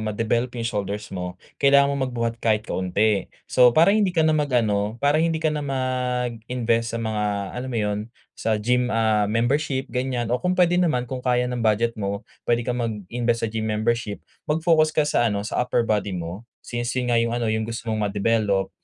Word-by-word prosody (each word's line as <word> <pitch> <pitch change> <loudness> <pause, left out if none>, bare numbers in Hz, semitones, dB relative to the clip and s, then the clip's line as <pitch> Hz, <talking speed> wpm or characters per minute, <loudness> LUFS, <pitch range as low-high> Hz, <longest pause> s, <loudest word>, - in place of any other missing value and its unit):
ma-develop 115 +3 0
yung 115 - -3
shoulders 105 -2 -3
mo. 90 -1 -5 0.2
Kailangan 140 0 +5
mong 140 -1 -1
magbuhat 115 -2 -2
kahit 110 -1 +1
kaunti. 100 +2 0 0.2
So, 125 -1 +5
para 170 +5 +6
hindi 200 -5 +1
ka 160 - +4
na 155 - +4
mag-ano, 115 -8 +1
para 145 +4 +2
hindi 165 0 +1
ka 155 -1 0
na 150 - -2
mag-invest 125 -3 -1
sa - - -3
mga 110 -1 -1 0.3
alam 125 +1 -5
mo 120 - -3
yun 105 -1 0 0.3
sa 110 -1 -1
gym, 125 +3 +1
ah, 110 -2 +2
membership 130 +4 0
ganyan 125 -2 -1
o 125 - +1
kung 180 0 0
pwede 175 0 +4
naman 125 -8 +1
kung 130 +1 -5
kaya 125 -1 +1
ng 125 -1 -3
budget 115 +1 +2
mo, 100 0 -3 0.2
puwede 120 0 +2
kang 125 +1 -2
mag-invest 115 +2 -2
sa 115 - 0
gym 110 0 -2
membership, 110 0 -1 0.2
mag-focus 155 0 +3
ka 155 - +4
sa 120 -5 +2
ano 100 -1 -2
sa 110 - -1
upper 120 -1 +1
body 105 -4 -1
mo. 90 +8 -7 0.2
Since 120 +1 -3
yun 125 -1 0
nga 115 - +4
yung 115 +1 0
ano 120 - -1
yung 110 0 -2
gusto 115 0 -4
mong 105 -1 0
ma-develop, 100 -1 +1
120 Hz, 200 wpm, -23 LUFS, 110-130 Hz, 0.3 s, para